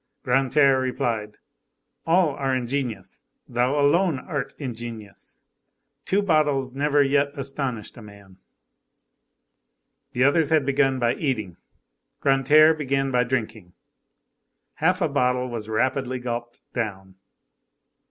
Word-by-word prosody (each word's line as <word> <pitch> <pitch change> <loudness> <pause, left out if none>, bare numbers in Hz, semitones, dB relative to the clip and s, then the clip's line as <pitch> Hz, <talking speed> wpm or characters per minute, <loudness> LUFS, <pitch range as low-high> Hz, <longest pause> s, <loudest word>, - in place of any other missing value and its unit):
Grantaire 135 +1 +3
replied:— 115 -4 -2 0.7
"All 170 -1 +3
are 135 -1 -1
ingenious, 120 -5 -4 0.3
thou 125 +4 0
alone 160 +2 +3
art 135 -1 -5
ingenuous. 115 -6 -8 0.7
Two 200 +2 +1
bottles 145 -7 +1
never 145 +1 +2
yet 140 +1 +2
astonished 135 -5 -4
a - - -10
man." 100 -3 -15 1.8
The 125 - +1
others 145 +2 +3
had 155 -3 +2
begun 135 -1 +2
by 120 -1 +1
eating, 110 - -3 0.6
Grantaire 145 +4 +5
began 135 -3 -1
by 125 -1 +3
drinking. 110 -7 -4 1.0
Half 180 +4 +1
a 165 - +3
bottle 125 -3 0
was 110 -2 -6
rapidly 130 +3 -1
gulped 120 -1 -6
down. 95 -5 -4
130 Hz, 110 wpm, -24 LUFS, 120-145 Hz, 1.8 s, Grantaire